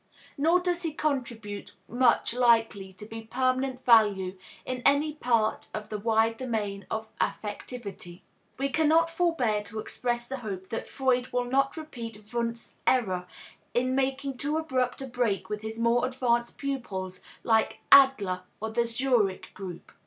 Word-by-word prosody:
Nor 325 Hz, +5 st, +3 dB
does 355 Hz, -1 st, -1 dB
he 325 Hz, -3 st, -3 dB
contribute 235 Hz, -9 st, -3 dB
much 240 Hz, 0 st, +3 dB
likely 225 Hz, -5 st, +3 dB
to 190 Hz, +3 st, -10 dB
be 225 Hz, +1 st, -7 dB
of 225 Hz, 0 st, -13 dB
permanent 255 Hz, +1 st, 0 dB
value 205 Hz, -5 st, +5 dB, 0.3 s
in 255 Hz, -1 st, -3 dB
any 290 Hz, +2 st, +3 dB
part 230 Hz, -6 st, +1 dB
of 215 Hz, -1 st, -5 dB
the 210 Hz, -, -3 dB
wide 225 Hz, +1 st, +2 dB
domain 215 Hz, -6 st, -3 dB
of 220 Hz, 0 st, -3 dB
affectivity. 205 Hz, -4 st, -4 dB, 0.4 s
We 275 Hz, +2 st, 0 dB
cannot 320 Hz, +3 st, +3 dB
forbear 325 Hz, -12 st, +1 dB
to 215 Hz, -, -7 dB
express 240 Hz, +2 st, -2 dB
the 270 Hz, -, -4 dB
hope 195 Hz, -6 st, -6 dB
that 225 Hz, -, -4 dB
Freud 255 Hz, -2 st, +1 dB
will 245 Hz, 0 st, 0 dB
not 275 Hz, +4 st, +1 dB
repeat 230 Hz, -8 st, -8 dB
Wundt's 235 Hz, -1 st, -3 dB
error 185 Hz, -8 st, +2 dB, 0.5 s
in 255 Hz, +1 st, +2 dB
making 270 Hz, 0 st, -1 dB
too 295 Hz, +4 st, -1 dB
abrupt 260 Hz, -5 st, -1 dB
a -, -, -5 dB
break 240 Hz, -5 st, -1 dB
with 210 Hz, 0 st, -3 dB
his 220 Hz, +1 st, -6 dB
more 235 Hz, +2 st, +2 dB
advanced 240 Hz, -2 st, 0 dB
pupils 195 Hz, -10 st, -4 dB, 0.2 s
like 220 Hz, -1 st, +2 dB
Adler 265 Hz, -10 st, +6 dB, 0.2 s
or 220 Hz, +1 st, -3 dB
the 235 Hz, +1 st, +1 dB
Zurich 230 Hz, -5 st, 0 dB
group. 185 Hz, -4 st, -8 dB
240 Hz, 155 wpm, -28 LUFS, 215-265 Hz, 0.5 s, Adler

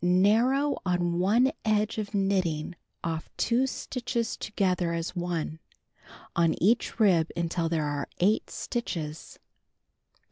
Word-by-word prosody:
Narrow 225 Hz, +11 st, +3 dB
on 175 Hz, -1 st, 0 dB
one 230 Hz, +8 st, +4 dB
edge 215 Hz, 0 st, +1 dB
by 210 Hz, -2 st, -2 dB
knitting 185 Hz, -6 st, 0 dB, 0.3 s
off 165 Hz, -1 st, -3 dB
2 245 Hz, +3 st, +2 dB
stitrhos 240 Hz, -3 st, -3 dB
together 180 Hz, -4 st, 0 dB
as 165 Hz, +2 st, -3 dB
one, 170 Hz, -3 st, -3 dB, 0.8 s
on 165 Hz, -1 st, +3 dB
each 225 Hz, +5 st, +2 dB
rib 175 Hz, -7 st, +4 dB
until 170 Hz, 0 st, 0 dB
there 160 Hz, -2 st, 0 dB
are 145 Hz, -1 st, -3 dB
8 205 Hz, +5 st, +2 dB
stitches. 160 Hz, -10 st, -4 dB
185 Hz, 115 wpm, -28 LUFS, 170-220 Hz, 0.8 s, one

